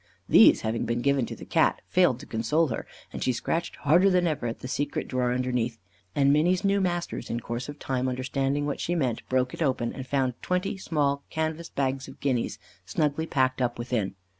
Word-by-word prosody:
These - - +7
having 110 +1 -1
been 120 +1 -1
given 140 -4 +2
to - - -6
the - - -10
Cat, - - +2
failed 175 -9 +3
to - - -10
console 135 +8 +1
her, 115 - -4 0.3
and - - -4
she 130 - +2
scratched 165 +7 -2
harder 170 +7 +4
than 180 -1 +3
ever 150 -7 -1
at 115 - -5
the - - -5
secret 145 +2 -2
drawer 125 -1 0
underneath; 125 -2 -1 0.4
and 140 0 +4
Minny's 175 +5 +2
new 200 0 +2
masters, 175 -2 -2
in 115 - -1
course 120 +3 -5
of 145 - -7
time 130 -2 -1
understanding 135 +3 -1
what 145 - -2
she 175 - -1
meant, 130 -8 0
broke 130 0 +1
it - - -7
open, 130 -5 0
and 130 -1 -7
found 130 -2 +1
twenty 180 +2 -1
small 145 -6 0
canvas 160 +1 -2
bags 135 -1 -1
of - - -12
guineas 130 -4 -1 0.3
snugly 150 - -1
packed 130 -3 +1
up 120 -1 0
within. 120 -5 -2
135 Hz, 205 wpm, -27 LUFS, 125-160 Hz, 0.4 s, These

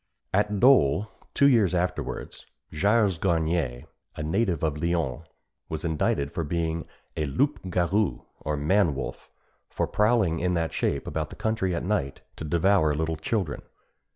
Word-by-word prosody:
At 105 +2 +2
Dôle, 105 - +4 0.3
two 140 - +5
years 110 -9 +4
afterwards, 90 +1 -3 0.3
Gilles 100 +1 +2
Garnier, 80 -8 0 0.3
a 75 - -4
native 85 +1 0
of 75 -1 -1
Lyons, 85 -3 -1 0.4
was 80 +1 -3
indicted 75 -3 0
for 85 - -2
being 80 +1 -2 0.3
a 75 - -1
loup 110 - 0
garou, 90 +3 0 0.2
or 75 0 -2
man 80 +1 +2
wolf, 65 - -6 0.4
and - - -31
for - - +1
prowling 105 -6 +2
in 90 +1 0
that 80 -1 -1
shape - - -1
about 80 -1 -3
the - - -10
country 110 -5 -1
at 85 - -3
night 90 -9 -1 0.2
to - - -6
devour 85 0 +2
little 80 +1 -1
children. 80 0 -2
85 Hz, 155 wpm, -26 LUFS, 80-100 Hz, 0.4 s, two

